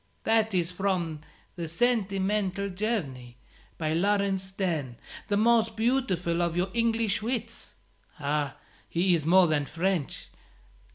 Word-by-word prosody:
"That 220 -2 +2
is 175 -1 +2
from 180 -4 -1 0.4
the 170 -2 -4
'Sentimental 200 0 0
Journey,' 160 - -3 0.4
by 155 -1 -1
Laurence 195 +1 +1
Sterne, 170 - -3 0.3
the 205 - +1
most 225 0 +3
beautiful 220 -8 0
of 170 0 0
your 180 +2 0
English 230 -3 +1
wits. 230 0 -4 0.4
Ah, 145 -1 -1 0.3
he 175 +8 +2
is 160 -3 0
more 185 +2 +7
than 150 -3 0
French! 170 -2 -2
190 Hz, 120 wpm, -28 LUFS, 165-215 Hz, 0.4 s, more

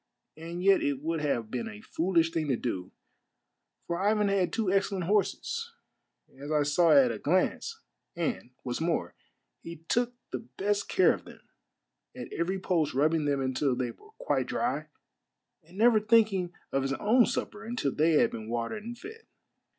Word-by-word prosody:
And 170 +3 -6
yet 195 0 +5
it 140 -1 -1
would 165 0 -1
have 120 -7 -1
been 230 - -3
a 215 -1 -9
foolish 165 -4 +1
thing 160 -2 -1
to 135 - +2
do, 95 -7 -4 0.9
for 170 0 -2
Ivan 210 0 +2
had 195 -2 +1
two 220 -5 0
excellent 195 -1 +1
horses, 455 - -1 0.7
as 145 +2 -6
I 150 -1 +3
saw 155 +4 +3
at 140 -5 +6
a 110 - -5
glance, 185 - 0 0.4
and, 165 -7 -2
what's 125 +4 -3
more, 165 0 -1 0.5
he 170 - -8
took 245 0 +1 0.2
the 130 - -3
best 200 +12 -2
of - - -23
care 375 - +4
of - - -8
them, - - -13 0.7
at - - -8
every 180 +3 -1
post 165 -7 0
rubbing 155 +2 +2
them 140 -1 +1
until 130 0 0
they 125 -1 -2
were 420 - -19
quite - - 0
dry, - - -1 0.7
and 170 +4 -17
never 225 0 +5
thinking 210 -5 +3 0.2
of 135 - +1
his 135 0 -1
own 225 - +4
supper 210 +1 -3
until 225 - -2
they 160 +2 +3
had 150 - +4
been 110 -1 -7
watered 120 - -3
and 240 +2 -7
fed. 440 - -11
170 Hz, 175 wpm, -29 LUFS, 145-210 Hz, 0.9 s, at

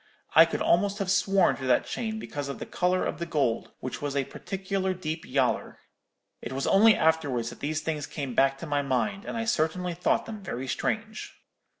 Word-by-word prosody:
I 160 - +9
could 165 - -2
almost 200 +3 +2
have 195 -3 -1
sworn 195 0 +3
to 130 - -6
that 125 - +3
chain 220 -2 -3
because 145 -9 -5
of 140 - -4
the - - -6
colour 180 +1 0
of - - -3
the 170 - -2
gold, 135 -8 0
which 130 - -5
was 145 -1 -3
a 140 - +2
particular 190 +2 -3
deep 160 -2 -4
yaller. 130 -1 0 0.6
It - - -6
was 135 +1 -2
only 215 +2 +6
afterwards 145 -8 +1
that - - -12
these 155 +2 -2
things 155 -2 -3
came 140 -5 -5
back 135 +2 +3
to 150 - -7
my 145 -2 0
mind, 170 - -1
and - - -4
I 225 - -1
certainly 180 -3 0
thought 170 - +1
them 215 -2 -7
very 135 -8 -5
strange.' 215 - -3
160 Hz, 205 wpm, -27 LUFS, 140-195 Hz, 0.6 s, I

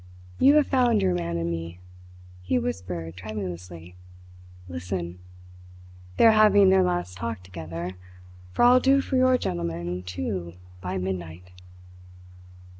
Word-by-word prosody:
You 280 +2 +6
have 300 -2 +5
found 245 -4 +2
your 90 - +2
man 85 -1 -2
in 85 0 -2
me," 85 +1 -6 0.6
he 90 +8 0
whispered 90 -8 -4
tremulously. 90 -3 -7 0.7
"Listen! 90 0 -5 1.0
They - - +5
are 225 - +9
having 205 -3 +6
their 190 0 +5
last 175 - -1
talk 115 -2 -5
together; 85 -1 -6 0.6
for - - +1
I'll 250 +1 +7
do 270 +2 +4
for 270 - -3
your 255 0 +4
gentleman, 85 - -3
too, 90 -1 -4 0.3
by 90 +1 -3
midnight." 90 -1 -5
90 Hz, 125 wpm, -25 LUFS, -, 1.0 s, are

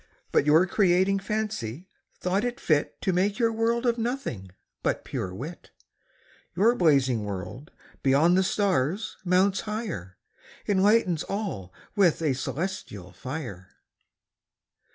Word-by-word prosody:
But 145 - +2
your 160 +4 +6
Creating 190 0 +3
Fancy, 195 - -3 0.3
thought 190 +4 0
it 245 +1 -2
fit 155 - 0
To 190 - +1
make 200 +4 +1
your 230 -2 +2
World 230 +2 0
of 235 -1 +1
Nothing, 225 - -3 0.3
but - - -1
pure 95 - -4
Wit. 140 - -8 0.9
Your 215 +7 +4
Blazing 135 - +3
World, 105 - -6 0.3
beyond 145 +6 +4
the 190 - +4
Stars 190 - 0
mounts 190 +2 +3
higher, 210 - -5 0.5
Enlightens 195 -4 +3
all 195 - -4 0.2
with 185 -6 +4
a 150 - +2
Cœlestial 135 - -4
Fier. 130 - -5
William 145 - -5
Newcastle. 95 0 -14
180 Hz, 130 wpm, -26 LUFS, 135-205 Hz, 0.9 s, your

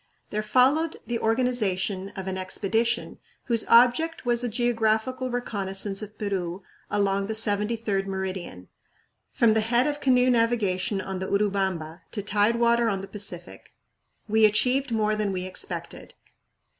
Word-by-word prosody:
There 210 - -1
followed 265 +9 +2
the 240 -1 -2
organization 215 -5 0
of 190 -2 -5
an 190 0 -3
expedition 220 +5 -1 0.2
whose 230 -3 0
object 250 +7 +4
was 240 0 +1
a 245 - -1
geographical 235 +2 0
reconnaissance 200 -4 -3
of 210 0 -9
Peru 190 -3 -3 0.3
along 200 -1 0
the 220 - -3
73d 210 -1 0
meridian, 190 - -5 0.6
from 230 -2 +3
the 220 - +2
head 240 +3 +2
of 295 0 -2
canoe 255 -1 +4
navigation 215 -5 +1
on 190 -1 -5
the 190 - -4
Urubamba 190 -5 -1
to 205 - -3
tidewater 235 +3 +2
on 195 -2 -2
the 195 - -8
Pacific. 195 -4 -6 0.5
We 220 0 +4
achieved 250 +5 +2
more 215 -1 +1
than 210 -2 -1
we 185 -1 -3
expected. 185 - -3
215 Hz, 140 wpm, -25 LUFS, 195-235 Hz, 0.6 s, object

